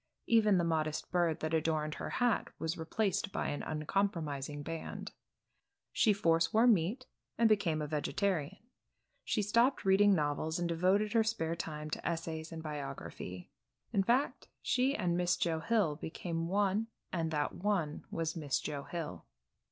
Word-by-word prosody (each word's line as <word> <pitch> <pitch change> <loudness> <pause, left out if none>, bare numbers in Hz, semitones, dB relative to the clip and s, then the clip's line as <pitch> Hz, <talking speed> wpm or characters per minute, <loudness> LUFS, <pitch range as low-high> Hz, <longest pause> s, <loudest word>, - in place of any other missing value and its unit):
Even 215 -4 +4
the 175 - +2
modest 155 -2 -1
bird 170 -3 +1
that 155 +1 -2
adorned 155 -1 +1
her - - -5
hat 245 -3 +1
was 160 +1 -2
replaced 195 +5 -1
by - - -1
an 145 - -3
uncompromising 150 -3 -2
band. 165 +1 -5 0.8
She 215 - +4
foreswore 170 +2 +3
meat 220 +4 +2 0.3
and 230 - +5
became 175 -8 +2
a - - -3
vegetarian. 160 +3 -1 0.7
She 210 - 0
stopped 235 +6 +2
reading 195 +1 +6
novels 155 +1 0
and 175 -1 0
devoted 185 +6 +2
her 225 -1 +5
spare 170 -7 -1
time 155 -2 -5
to - - -4
essays 165 -1 -3
and 160 -1 -6
biography. 140 - -6 0.4
In 200 - +4
fact 240 +8 +1 0.2
she 260 +3 +2
and 175 -4 0
Miss 175 0 +2
Joe 165 -2 0
Hill 185 -6 +1
became 165 +1 -4
one 200 +3 +1 0.3
and 165 -3 0
that 150 -2 -1
one 180 -6 -1
was 165 -1 -2
Miss 150 -5 -1
Joe 145 -2 -4
Hill. 170 -3 -5
170 Hz, 150 wpm, -33 LUFS, 155-205 Hz, 0.8 s, reading